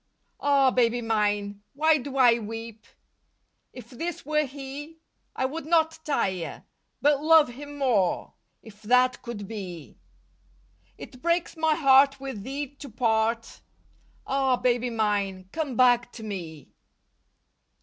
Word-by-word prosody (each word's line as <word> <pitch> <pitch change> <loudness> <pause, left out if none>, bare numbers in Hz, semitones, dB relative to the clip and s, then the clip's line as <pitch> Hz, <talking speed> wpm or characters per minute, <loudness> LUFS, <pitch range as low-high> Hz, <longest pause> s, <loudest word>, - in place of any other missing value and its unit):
'' - - -46
Ah, 275 -2 +3
baby 245 -1 +2
mine, 205 -3 -1
why 310 +1 +3
do 275 +1 -6
I 240 -3 +5
weep. 225 0 -8 0.8
If 250 - -12
this 330 +6 -5
were 305 +1 +1
he 285 +4 -9 0.4
I 260 - 0
would 300 +3 -5
not 320 -1 +2
tire, 190 - -2 0.4
but 290 -1 +4
lovo 315 -4 +6
him 290 +3 -10
more 230 -10 0 0.3
If 210 -2 -15
that 250 +3 +3
could 215 -5 -7
be. 185 -7 -8 1.0
It 255 - -11
breaks 340 +1 0
my 320 -1 +2
heart 275 -2 +5
with 265 -6 -6
thee 275 +5 -5
to 280 - -8
part, 230 0 -1 0.6
Ah, 270 -1 +1
baby 245 0 0
mine, 205 -4 -1
come 300 -6 -3
back 245 -1 +4
to 225 - -9
me. 170 -8 -7
250 Hz, 130 wpm, -26 LUFS, 220-285 Hz, 1.0 s, lovo